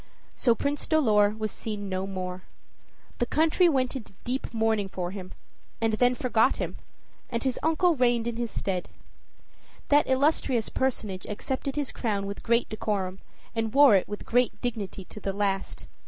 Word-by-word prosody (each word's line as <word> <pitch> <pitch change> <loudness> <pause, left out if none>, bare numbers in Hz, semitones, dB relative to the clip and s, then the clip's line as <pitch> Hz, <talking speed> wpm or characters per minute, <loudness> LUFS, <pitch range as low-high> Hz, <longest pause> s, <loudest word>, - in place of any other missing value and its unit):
So 235 -3 +3
Prince 285 +4 -2
Dolor 215 -10 +4
was 215 -1 -2
seen 210 -2 -5
no 190 0 -2
more. 185 -1 -4 0.8
The 240 - +1
country 325 +5 +4
went 260 -3 +1
into 220 -6 -7
deep 255 +2 -3
mourning 220 -3 +1
for 180 -2 -4
him, 190 -2 -7 0.5
and 225 -1 +1
then 245 +3 +3
forgot 245 0 +2
him, - - -4 0.5
and 235 -2 -2
his 260 -2 0
uncle 325 +2 +3
reigned 240 -3 +2
in 235 -1 -2
his 235 -1 -2
stead. 185 -3 -3 1.0
That 290 +1 +5
illustrious 260 -4 +2
personage 210 -8 -2
accepted 260 +5 -3
his 290 -3 -2
crown 205 -4 -2
with 200 0 -5
great 235 +1 +2
decorum, 195 -3 -2 0.3
and 225 +1 -2
wore 285 -4 +8
it 190 - +2
with 205 - -6
great 245 0 +2
dignity 210 -6 -4
to 210 - -10
the 195 -1 -3
last. 195 -1 -2
225 Hz, 165 wpm, -27 LUFS, 200-260 Hz, 1.0 s, wore